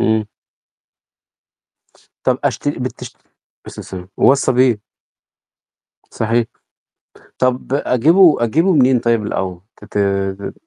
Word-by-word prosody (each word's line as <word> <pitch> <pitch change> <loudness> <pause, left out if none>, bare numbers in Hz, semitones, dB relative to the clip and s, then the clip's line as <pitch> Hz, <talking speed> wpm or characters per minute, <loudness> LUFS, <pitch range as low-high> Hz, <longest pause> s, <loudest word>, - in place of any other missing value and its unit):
إمم. 110 -1 +1 2.0
طب 130 -1 +1
أشتر 145 +1 -2
بتش 125 0 -6
عليه - - -39 0.4
الصلاة - - -10
والسلام، 90 -1 -9
وَصَّى 135 +1 +3
بيه. 125 -4 +2 1.3
صحيح، 115 +1 0 0.9
طب 130 0 -1
أجيبه 150 +3 +4
أجيبه 165 - +2
منين 130 -5 +4
طيب 115 -2 +1
الأول؟ 95 -3 -3 0.2
تتاب 100 -1 -2
120 Hz, 95 wpm, -17 LUFS, 105-135 Hz, 2.0 s, أجيبه